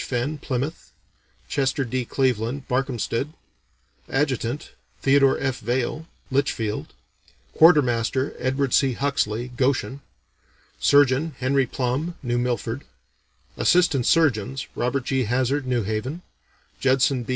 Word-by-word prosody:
Fenn, 130 +5 -2
Plymouth; 140 +4 -4 0.6
Chester 135 -1 0
D. 125 +1 -2
Cleveland, 125 +1 -1
Barkhamsted; 130 +1 -1 0.8
adjutant, 135 -1 -1 0.3
Theodore 135 0 +4
F. 135 -2 -2
Vaill, 125 +7 -2 0.2
Litchfield; 115 - -1 0.6
quartermaster, 130 -5 +4
Edward 135 0 0
C. 135 -2 +3
Huxley, 125 -3 -1
Goshen; 130 +2 -1 0.8
surgeon, 145 +2 +3
Henry 130 0 +1
Plumb, 135 +8 -2
New 120 -1 0
Milford; 120 +1 -2 0.7
assistant 170 -8 +3
surgeons, 135 -5 +2
Robert 125 +2 -1
G. 130 -2 0
Hazzard, 130 +4 0
New 125 -3 +1
Haven; 120 - -3 0.6
Judson 130 0 +2
B. 120 - -10
130 Hz, 105 wpm, -24 LUFS, 120-140 Hz, 0.8 s, Theodore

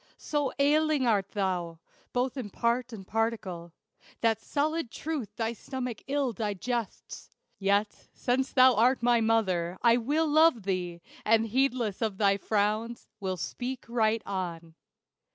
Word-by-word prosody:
So 290 -3 -1
ailing 295 0 +3
art 200 -4 +2
thou, 180 -4 -2 0.3
both 250 +1 -1
in 250 -6 -5
part 235 +4 0
and 205 -4 -8
particle, 195 -6 -2 0.5
That 225 -1 +2
solid 310 0 -1
truth 290 -5 -5
thy 225 0 -1
stomach 250 0 -5
ill 275 -3 0
digests. 220 +2 -4 0.3
Yet, 200 +1 0
since 260 +1 -1
thou 255 -1 +6
art 240 +3 +3
my 240 -1 +4
mother, 190 -6 +1
I 235 0 +6
will 295 +7 +1
love 310 -6 +4
thee, 180 -3 -3 0.2
And 225 +1 +3
heedless 245 -3 0
of 215 -4 -1
thy 200 -1 +3
frowns, 215 +3 -1
"will 190 -2 -2
speak 245 - -5
right 225 -1 +1
on." 170 -4 -4
225 Hz, 135 wpm, -29 LUFS, 200-255 Hz, 0.5 s, thou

